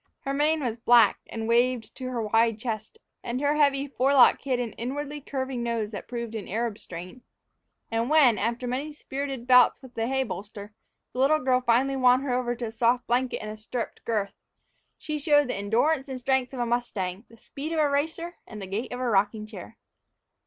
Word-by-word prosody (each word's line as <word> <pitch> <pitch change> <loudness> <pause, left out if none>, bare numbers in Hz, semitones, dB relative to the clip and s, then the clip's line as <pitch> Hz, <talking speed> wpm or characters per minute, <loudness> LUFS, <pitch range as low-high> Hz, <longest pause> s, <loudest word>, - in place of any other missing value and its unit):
Her 275 -1 -3
mane 305 +2 +2
was 235 -2 -2
black 235 0 +5
and 225 -1 -5
waved 240 0 +1
to 260 - -6
her 240 -3 -2
wide 225 +1 +2
chest, 220 - -5 0.3
and 240 +2 -3
her 290 +1 +2
heavy 280 -2 +2
forelock 270 -1 +4
hid 260 -3 -1
an 235 -3 -3
inwardly 290 +4 -5
curving 260 -2 -4
nose 230 -3 -2
that 205 - -7
proved 235 -2 -5
an 220 -3 -5
Arab 225 +1 -2
strain. 180 +7 -9 0.7
And 230 +2 0
when, 285 -8 +5
after 235 +3 -1
many 270 +5 -3
spirited 275 -3 -5
bouts 250 -1 +6
with 260 -2 -14
the 225 -1 -2
hay 265 +1 +1
bolster, 205 -1 -8 0.4
the 250 - -5
little 280 +4 +4
girl 255 -3 +1
finally 255 +3 +2
won 255 0 +5
her 270 -3 -2
over 245 -1 0
to 240 0 -4
a 220 - -5
soft 240 +2 +1
blanket 245 -1 0
and 215 - -5
a 215 - -8
stirruped 230 +2 -5
girth, 210 -3 -1 0.6
she 305 -1 -4
showed 290 -2 +3
the - - 0
endurance 255 +8 +1
and 260 - -4
strength 255 0 0
of 265 - -7
a 240 - +1
mustang, 215 -4 -2
the 230 - -17
speed 285 +7 -7
of 330 - -2
a 300 - +4
racer, 320 +5 -2
and 215 - -9
the 195 - -6
gait 200 +6 -4
of 245 - -5
a 255 - -1
rocking 210 0 +1
chair. 215 +1 -11
245 Hz, 205 wpm, -26 LUFS, 225-270 Hz, 0.7 s, bouts